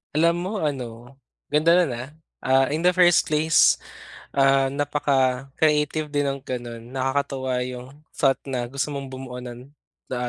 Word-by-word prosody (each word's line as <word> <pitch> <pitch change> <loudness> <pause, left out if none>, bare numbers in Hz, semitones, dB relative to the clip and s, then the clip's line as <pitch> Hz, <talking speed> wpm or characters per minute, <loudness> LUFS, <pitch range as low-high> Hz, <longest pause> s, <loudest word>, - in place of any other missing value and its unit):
Alam 170 +2 +3
mo 185 +3 -4
ano, 125 -3 -5 0.4
ganda 155 +3 +4
nun 175 -6 +3
ah. 120 +3 -6 0.3
Ah, 135 0 +3
in 155 - -1
the 180 0 +4
first 175 -2 +5
place, 155 +1 +4 0.6
ah, 135 -1 +3
napaka-creative 145 +2 0
din 145 -1 +1
ng 135 0 -2
gano'n, 120 -2 -5
nakakatuwa 130 -1 -1
'yung 125 0 -7 0.3
thought 135 -2 +2
na 125 -3 -2
gusto 140 +2 -2
mong 140 -1 -5
bumuo 130 -1 -7
nun, 125 +3 -10 0.3
the, 130 - -4
135 Hz, 145 wpm, -23 LUFS, 130-150 Hz, 0.6 s, first